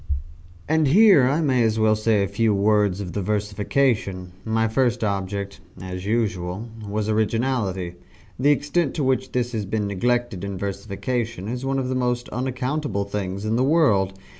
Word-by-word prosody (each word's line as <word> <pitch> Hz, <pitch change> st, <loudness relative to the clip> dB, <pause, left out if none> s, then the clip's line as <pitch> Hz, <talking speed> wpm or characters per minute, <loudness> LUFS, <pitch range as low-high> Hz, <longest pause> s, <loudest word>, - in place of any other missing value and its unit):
And 155 Hz, -1 st, +3 dB
here 185 Hz, -, +6 dB
I 150 Hz, +4 st, +1 dB
may 130 Hz, -5 st, +2 dB
as 110 Hz, -1 st, +2 dB
well 110 Hz, -1 st, +3 dB
say 110 Hz, -1 st, +2 dB
a -, -, 0 dB
few 105 Hz, +2 st, +1 dB
words 100 Hz, -1 st, +2 dB
of 90 Hz, -3 st, -6 dB
the 100 Hz, -, -2 dB
versification. 105 Hz, -1 st, 0 dB
My 115 Hz, 0 st, +1 dB
first 120 Hz, 0 st, +1 dB
object 100 Hz, -1 st, -3 dB, 0.2 s
(as 90 Hz, +1 st, -6 dB
usual) 105 Hz, -2 st, -1 dB, 0.2 s
was 105 Hz, +1 st, -1 dB
originality. 110 Hz, -4 st, 0 dB, 0.5 s
The 140 Hz, +3 st, +3 dB
extent 145 Hz, +1 st, +1 dB
to 150 Hz, -, -1 dB
which 130 Hz, -1 st, 0 dB
this 125 Hz, -1 st, 0 dB
has 110 Hz, -4 st, -3 dB
been 105 Hz, +1 st, -1 dB
neglected 120 Hz, 0 st, -1 dB
in 100 Hz, -1 st, -4 dB
versification 100 Hz, +3 st, -3 dB
is 125 Hz, +3 st, -4 dB
one 135 Hz, 0 st, 0 dB
of 130 Hz, -1 st, -1 dB
the 130 Hz, -, -1 dB
most 125 Hz, -1 st, -1 dB
unaccountable 130 Hz, -3 st, -2 dB
things 100 Hz, 0 st, -4 dB
in 110 Hz, +2 st, +1 dB
the 125 Hz, -, +2 dB
world. 110 Hz, -, +3 dB
110 Hz, 165 wpm, -23 LUFS, 100-125 Hz, 0.5 s, here